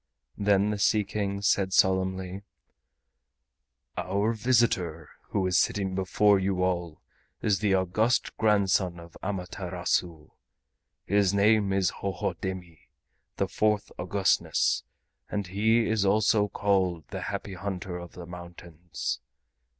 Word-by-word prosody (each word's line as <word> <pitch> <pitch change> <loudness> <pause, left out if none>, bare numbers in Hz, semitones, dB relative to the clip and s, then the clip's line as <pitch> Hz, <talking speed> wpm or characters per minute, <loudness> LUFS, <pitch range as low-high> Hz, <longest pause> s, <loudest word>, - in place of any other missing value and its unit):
Then 100 0 +3
the 105 - -3
Sea 105 +1 +3
King 100 0 -3
said 95 -2 +2
solemnly: 95 0 +1 1.5
"Our 100 +5 0
visitor 105 -9 +1 0.2
who 95 -2 0
is 90 -1 +3
sitting 95 -2 0
before 95 +2 +3
you 95 -1 0
all 85 -3 -2 0.4
is 100 -3 +2
the 100 -3 +2
august 100 +6 +1
grandson 95 -5 +2
of 85 0 -13
Amaterasu. 90 -4 -3 0.7
His 100 -1 +2
name 105 0 +3
is 95 -1 +2
Hohodemi, 95 -3 -4 0.6
the - - 0
fourth 105 -1 0
Augustness, 95 +2 +1 0.5
and 100 -1 -2
he 110 +5 +2
is 110 -2 +1
also 105 +1 +3
called 95 -7 0
the - - -5
Happy 100 - -4
Hunter 90 -1 -5
of 85 -1 -10
the 90 - -9
Mountains. 85 -1 -6
95 Hz, 115 wpm, -27 LUFS, 90-105 Hz, 1.5 s, Then